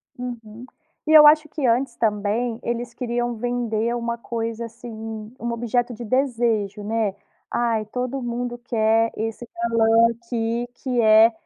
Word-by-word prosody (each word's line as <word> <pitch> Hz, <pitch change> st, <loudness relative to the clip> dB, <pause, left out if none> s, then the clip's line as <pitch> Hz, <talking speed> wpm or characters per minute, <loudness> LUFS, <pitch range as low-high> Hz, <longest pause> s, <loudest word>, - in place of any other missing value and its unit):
Uhum. 240 Hz, -2 st, -8 dB, 0.4 s
E 310 Hz, -, 0 dB
eu 305 Hz, -1 st, +10 dB
acho 310 Hz, +1 st, +5 dB
que 295 Hz, -2 st, -3 dB
antes, 240 Hz, +1 st, +1 dB
também, 220 Hz, +2 st, 0 dB
eles 240 Hz, 0 st, -3 dB
queriam 240 Hz, -1 st, -2 dB
vender 235 Hz, -1 st, -1 dB
uma 235 Hz, 0 st, -2 dB
coisa 230 Hz, 0 st, -4 dB
assim, 235 Hz, +1 st, -10 dB, 0.5 s
um 235 Hz, 0 st, -3 dB
objeto 240 Hz, +1 st, -1 dB
de 235 Hz, +1 st, -8 dB
desejo, 230 Hz, -5 st, 0 dB
né: 215 Hz, -2 st, -1 dB, 0.3 s
"Aí, 230 Hz, -2 st, 0 dB
todo 250 Hz, +3 st, -3 dB
mundo 240 Hz, 0 st, -3 dB
quer 225 Hz, -2 st, +1 dB
esse 225 Hz, +2 st, -4 dB
balão 230 Hz, 0 st, +4 dB
aqui, 235 Hz, 0 st, -3 dB
que 250 Hz, -2 st, -1 dB
é 220 Hz, +1 st, +7 dB
235 Hz, 140 wpm, -23 LUFS, 225-245 Hz, 0.5 s, eu